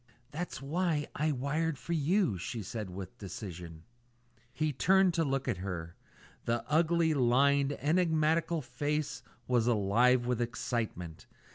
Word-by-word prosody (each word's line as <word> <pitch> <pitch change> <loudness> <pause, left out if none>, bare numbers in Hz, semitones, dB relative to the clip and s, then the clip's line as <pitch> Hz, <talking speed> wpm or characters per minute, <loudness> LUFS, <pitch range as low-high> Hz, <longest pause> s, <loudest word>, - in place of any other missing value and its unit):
"That's 160 -2 -5
why 160 0 0
I 155 +1 0
wired 145 +3 -1
for 170 - -4
you," 170 - +2
she 110 +5 -4
said 105 0 -5
with 95 +1 -8
decision. 85 -4 -8 0.7
He 150 +4 -1
turned 190 +6 +4
to 165 0 +2
look 135 -2 -1
at 115 -7 0
her. 90 -3 -5 0.5
The 120 0 -1
ugly, 165 +1 +3
lined, 140 +2 +3
enigmatical 160 0 +1
face 145 +4 -2 0.3
was 120 -2 +2
alive 120 +3 +3
with 125 -1 0
excitement. 115 -8 -3
135 Hz, 130 wpm, -31 LUFS, 115-160 Hz, 0.7 s, turned